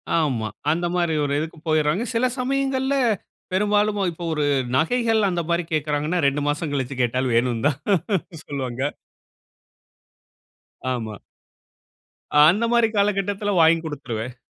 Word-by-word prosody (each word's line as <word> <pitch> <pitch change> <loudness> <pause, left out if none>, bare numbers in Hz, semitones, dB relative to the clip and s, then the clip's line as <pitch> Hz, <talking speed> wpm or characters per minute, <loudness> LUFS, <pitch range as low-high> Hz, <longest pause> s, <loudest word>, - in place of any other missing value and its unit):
ஆமா. 130 -9 0 0.2
அந்தமாரி 175 0 0
ஒரு 140 0 -1
இதுக்கு 160 +1 -5
போயர்றாங்க. 155 +7 +2
சில 230 +2 +2
சமயங்கள்ல, 270 +1 0 0.6
பெரும்பாலும் 210 +1 +2
இப்ப 170 +1 -9
ஒரு 150 -1 0 0.3
நகைகள் 225 - +2
அந்தமாரி 170 0 -1
கேட்கிறாங்கன்னா, 150 +3 0
2 140 +1 0
மாசம் 150 0 -2
கழிச்சு 135 -1 -2
கேட்டாலும் 125 +1 0
வேணும்ன்னு 120 +2 +2
தான் 145 0 -4 0.7
சொல்லுவாங்க. 130 -3 -4 2.1
ஆமா. 110 -4 -5 1.3
அந்த 210 +8 +3
மாரி 235 -1 +4
காலகட்டத்தில 200 0 0
வாங்கிக் 165 0 +4
குடுத்துருவேன், 125 -5 -5
160 Hz, 110 wpm, -23 LUFS, 140-205 Hz, 2.1 s, மாரி